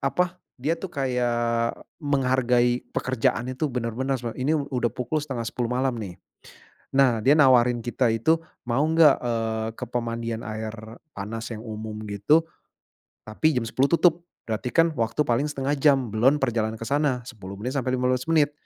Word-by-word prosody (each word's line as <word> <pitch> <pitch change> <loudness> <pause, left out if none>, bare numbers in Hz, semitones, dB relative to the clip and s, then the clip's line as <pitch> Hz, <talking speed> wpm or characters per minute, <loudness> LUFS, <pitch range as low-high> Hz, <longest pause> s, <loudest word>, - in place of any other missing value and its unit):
apa, 180 +6 -1 0.2
dia 145 +6 0
tuh 190 - -5
kayak 120 -3 0 0.2
menghargai 125 -4 +1
pekerjaan 130 0 0
itu 140 +4 -1
bener-bener 125 +2 -2
seme 120 -1 -5
ini 150 +5 +2
udah 135 -5 -1
pukul 125 +5 -2
9.30 120 -4 -3
malam 130 +1 +1
nih. 95 -5 -7 0.8
Nah, 130 -5 +4
dia 135 - +6
nawarin 125 -4 +5
kita 120 +1 0
itu 115 +9 +3 0.3
mau 130 +5 +2
nggak, 160 -2 +5
eee, 115 -2 -1
ke - - -3
pemandian 115 -1 -3
air 110 0 -4 0.4
panas 110 +3 -5
yang 110 0 -7
umum 110 -1 -6
gitu. 105 +11 +3 0.8
Tapi 130 +7 +1
jam 120 - -3
10.00 130 +5 +1
tutup 170 0 +3 0.2
berarti 110 +3 -2
kan 165 -1 +3
waktu 120 +4 0
paling 125 +5 +1
1/2 140 0 -1
jam, 135 -5 +3
belon 130 +6 +4
perjalanan 115 -4 -1
ke 115 - -6
sana 140 -3 0
10 100 -6 -9
menit 125 +6 -4
sampai 130 -1 0
15 125 +2 0
menit, 150 -3 +3
125 Hz, 160 wpm, -25 LUFS, 115-140 Hz, 0.8 s, dia